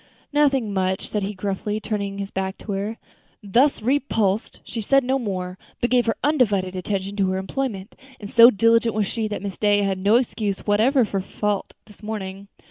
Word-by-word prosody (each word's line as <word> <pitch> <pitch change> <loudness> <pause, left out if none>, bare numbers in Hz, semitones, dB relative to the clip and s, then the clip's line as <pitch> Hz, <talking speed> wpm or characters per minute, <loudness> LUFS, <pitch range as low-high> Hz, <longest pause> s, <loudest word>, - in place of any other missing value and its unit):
"Nothing 275 -7 +2
much," 190 0 -1
said 210 - -1
he, 200 +1 -3
gruffly, 205 +2 -3
turning 205 -2 -3
his 200 0 -5
back 190 0 -3
to 210 - -7
her. 200 +3 -3 0.5
Thus 235 +5 +2
repulsed, 225 -6 0
she 225 - -5
said 275 +6 +3
no 265 +2 +1
more, 185 -5 -4 0.2
but 240 - -1
gave 245 -2 +3
her 225 - +1
undivided 205 -11 +1
attention 195 +1 -3
to 195 -2 +2
her 185 - -1
employment; 200 0 -4 0.2
and 205 - -7
so 230 +2 +8
diligent 230 +1 +3
was 215 -1 +1
she, 220 +2 -2
that 210 -1 -5
Miss 195 -3 -6
Day 205 -1 +3
had 195 -1 -1
no 200 +4 +3
excuse 215 -5 -1
whatever 230 +5 +3
for 195 -2 -2
fault 205 +1 -3
finding - - -53
this 210 0 -18
morning. 200 -2 -6
210 Hz, 195 wpm, -23 LUFS, 195-230 Hz, 0.5 s, so